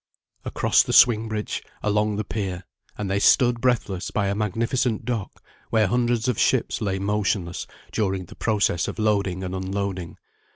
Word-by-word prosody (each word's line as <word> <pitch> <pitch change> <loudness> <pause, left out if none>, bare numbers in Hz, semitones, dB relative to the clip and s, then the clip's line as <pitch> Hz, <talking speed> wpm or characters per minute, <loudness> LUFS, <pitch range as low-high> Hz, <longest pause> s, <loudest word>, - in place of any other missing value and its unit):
Across - - +3
the - - -2
swing 115 -2 +6
bridge, 105 -1 -3 0.2
along 105 0 +1
the 105 - -2
pier, 95 -3 -4 0.3
and 105 - -3
they 95 +1 0
stood 120 +1 +4
breathless 105 -7 0
by 100 -2 0
a - - 0
magnificent 115 +3 -1
dock, 115 -6 -4 0.3
where 110 -2 +3
hundreds 120 +2 +1
of 125 - 0
ships - - +1
lay 100 -3 -1
motionless 100 -3 -1 0.2
during 95 -3 -1
the - - -13
process 100 -7 +1
of - - -5
loading 100 -4 0
and 90 0 -4
unloading. 95 -1 -4
105 Hz, 160 wpm, -24 LUFS, 95-110 Hz, 0.3 s, swing